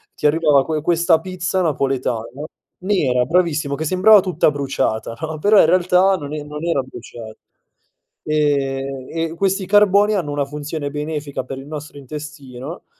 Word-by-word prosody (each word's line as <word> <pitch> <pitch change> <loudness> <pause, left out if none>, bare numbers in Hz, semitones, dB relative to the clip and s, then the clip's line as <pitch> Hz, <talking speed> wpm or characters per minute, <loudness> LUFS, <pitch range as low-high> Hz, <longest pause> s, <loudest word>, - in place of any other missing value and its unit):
ti - - -6
arrivava 150 -2 +4
que 155 -1 -2
questa 170 0 +3
pizza 185 0 -2
napoletana 135 -7 -1 0.6
nera, 150 -11 +1
bravissimo, 155 -2 +1
che 155 +3 -4
sembrava 190 +6 +6
tutta 180 -4 +1
bruciata, 135 -6 -2
no? 160 -1 -4
Però 205 +6 +4
in - - +7
realtà 185 +1 +3
non 145 -3 -7
e 150 -1 -4
non 150 +2 -7
era 165 -5 +1
brucia 120 -2 -11 1.0
e 135 -3 -1
e 165 0 -3
questi 195 +2 0
carboni 205 +1 +4
hanno 165 -7 -2
una 145 -1 -1
funzione 150 +1 -5
benefica 150 -2 -4
per 130 +1 -7
il 135 - -11
nostro 150 -1 -8
intestino 145 +1 -9
150 Hz, 150 wpm, -19 LUFS, 140-175 Hz, 1.0 s, in